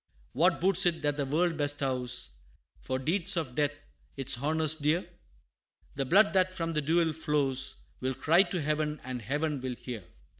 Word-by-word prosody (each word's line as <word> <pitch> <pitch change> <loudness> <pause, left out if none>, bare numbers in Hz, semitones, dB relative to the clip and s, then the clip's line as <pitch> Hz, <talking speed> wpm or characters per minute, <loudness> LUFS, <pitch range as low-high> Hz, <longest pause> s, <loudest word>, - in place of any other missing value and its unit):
What 170 +6 +3
boots 190 +1 +4
it 165 -2 -1
that 145 -1 +1
the 140 -2 -2
world 165 +3 +1
bestows, 135 -4 -1 0.5
For 130 - -3
deeds 175 +8 +1
of 150 -7 -2
death 145 +1 0 0.4
its 130 -2 +1
honors 155 +1 +2
dear? 155 +3 0 0.9
The 135 0 -2
blood 200 +10 +4
that 185 -1 +3
from 165 -2 -3
the 155 - 0
duel 160 +2 +2
flows, 145 -4 0 0.2
Will 130 0 -2
cry 165 +7 +4
to 190 -2 -1
heaven, 150 0 -1
and 125 -1 -5
heaven 145 +4 -2
will 130 -1 -4
hear! 120 -4 -7
150 Hz, 165 wpm, -29 LUFS, 135-165 Hz, 0.9 s, boots